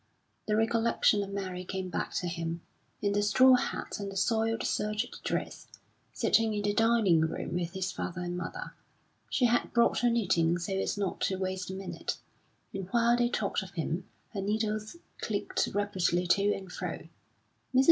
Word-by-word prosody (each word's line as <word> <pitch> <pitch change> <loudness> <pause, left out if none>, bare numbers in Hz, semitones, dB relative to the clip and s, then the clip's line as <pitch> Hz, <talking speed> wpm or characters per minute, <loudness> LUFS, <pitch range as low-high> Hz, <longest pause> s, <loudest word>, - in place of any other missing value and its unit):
The 210 - +2
recollection 225 -1 +3
of 200 - -4
Mary 190 -2 -4
came 190 0 -4
back - - -2
to 180 - -1
him, 170 0 -3 0.4
in 200 0 +2
the 205 - +2
straw 255 +6 +6
hat 250 - -1
and 200 -1 -4
the 195 - -5
soiled 225 +2 +1
serge 210 +2 0 0.2
dress, - - -3 0.4
sitting 225 -1 +2
in 205 - -1
the 205 0 +1
dining 225 -7 +4
room 160 +1 -2
with 175 0 -2
his 190 -1 -2
father 180 0 -4
and 175 0 -3
mother; 180 -2 -5 0.6
she 255 - +2
had 240 0 +2
brought 235 -1 +4
her 245 - +3
knitting 175 -7 +2
so 175 +3 -3
as 190 +1 -1
not 200 -3 -2
to 190 - +1
waste 185 -1 -3
a 190 - -4
minute; 190 -1 -4 0.6
and 195 -2 -4
while 235 +2 +4
they 240 0 +2
talked 215 -4 0
of 190 0 -10
him, 165 +2 -2 0.2
her 200 - -2
needles 215 - -1 0.2
clicked - - -1
rapidly 185 -3 +1
to 200 +3 +3
and 190 -2 -4
fro. - - -5 0.7
Mrs. - - +7
200 Hz, 180 wpm, -30 LUFS, 180-220 Hz, 0.7 s, Mrs